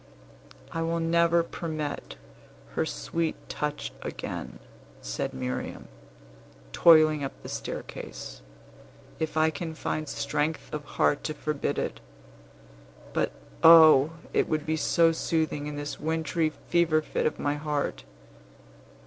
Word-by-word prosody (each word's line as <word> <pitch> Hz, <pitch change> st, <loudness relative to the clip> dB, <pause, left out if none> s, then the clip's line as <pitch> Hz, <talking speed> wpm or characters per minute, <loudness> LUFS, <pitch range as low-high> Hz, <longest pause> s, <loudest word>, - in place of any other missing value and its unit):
"I 165 Hz, -, -2 dB
will 165 Hz, +1 st, 0 dB
never 170 Hz, +1 st, +3 dB
permit 155 Hz, -3 st, -5 dB, 0.6 s
her -, -, 0 dB
sweet 165 Hz, -1 st, -2 dB
touch 150 Hz, 0 st, -3 dB
again," -, -, -6 dB, 0.4 s
said -, -, -3 dB
Miriam, 65 Hz, 0 st, -5 dB, 0.8 s
toiling 155 Hz, -3 st, +6 dB
up 135 Hz, -, -3 dB
the -, -, -7 dB
staircase, -, -, -6 dB, 0.8 s
"if 160 Hz, 0 st, -2 dB
I 160 Hz, 0 st, +4 dB
can 160 Hz, +1 st, -5 dB
find 155 Hz, -1 st, -3 dB
strength 150 Hz, +3 st, -2 dB
of 150 Hz, -1 st, -3 dB
heart 145 Hz, -, +3 dB
to 155 Hz, -, -2 dB
forbid 150 Hz, -1 st, -2 dB
it. -, -, -2 dB, 1.1 s
But, -, -, +1 dB, 0.3 s
O! 160 Hz, -2 st, +8 dB, 0.2 s
it -, -, +2 dB
would 155 Hz, -1 st, 0 dB
be 155 Hz, -, 0 dB
so 165 Hz, +2 st, +3 dB
soothing 160 Hz, -2 st, -1 dB
in 150 Hz, -, -5 dB
this 145 Hz, 0 st, -5 dB
wintry 160 Hz, +1 st, 0 dB
fever 155 Hz, 0 st, +1 dB
fit -, -, 0 dB
of 155 Hz, -, -3 dB
my 145 Hz, -, 0 dB
heart. 150 Hz, -1 st, -2 dB
155 Hz, 125 wpm, -27 LUFS, 150-165 Hz, 1.1 s, O